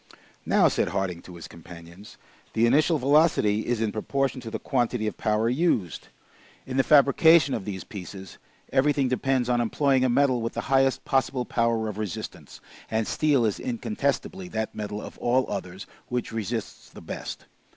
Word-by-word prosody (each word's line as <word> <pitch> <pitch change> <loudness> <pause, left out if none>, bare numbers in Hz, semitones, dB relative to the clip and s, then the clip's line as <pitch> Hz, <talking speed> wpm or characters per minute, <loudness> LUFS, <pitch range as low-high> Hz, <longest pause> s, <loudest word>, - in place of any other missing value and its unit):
"Now," - - +4
said - - 0
Harding 95 -3 -2
to 90 - -12
his 85 - -9
companions, 85 +3 -13 0.4
"the 115 +1 +3
initial 150 +7 +3
velocity 140 -7 +3
is 120 -2 0
in 110 -2 0
proportion 135 +4 -2
to 115 - -7
the - - -4
quantity 120 -4 -1
of 105 - -2
powder 110 0 0
used. 120 - 0 0.6
In 130 0 -4
the 135 - +4
fabrication 145 +1 +5
of 95 - -3
these 95 -3 -5
pieces, 95 -1 -9 0.3
everything 140 -1 +2
depends 130 -1 0
on 120 -1 +2
employing 135 +2 +2
a 130 - +2
metal 130 -1 +2
with 115 - -3
the - - -3
highest 135 0 +2
possible 130 -2 0
power 115 -2 0
of 105 -1 -5
resistance, 105 -5 -6 0.3
and 110 0 0
steel 145 -4 +2
is 105 - -1
incontestably 195 - -2
that 110 -10 -3
metal 105 -1 -5
of - - -10
all 125 +2 +2
others 95 -1 -6 0.2
which 125 -1 -3
resists 115 0 -5
the - - -13
best. - - -7
120 Hz, 170 wpm, -26 LUFS, 105-135 Hz, 0.6 s, fabrication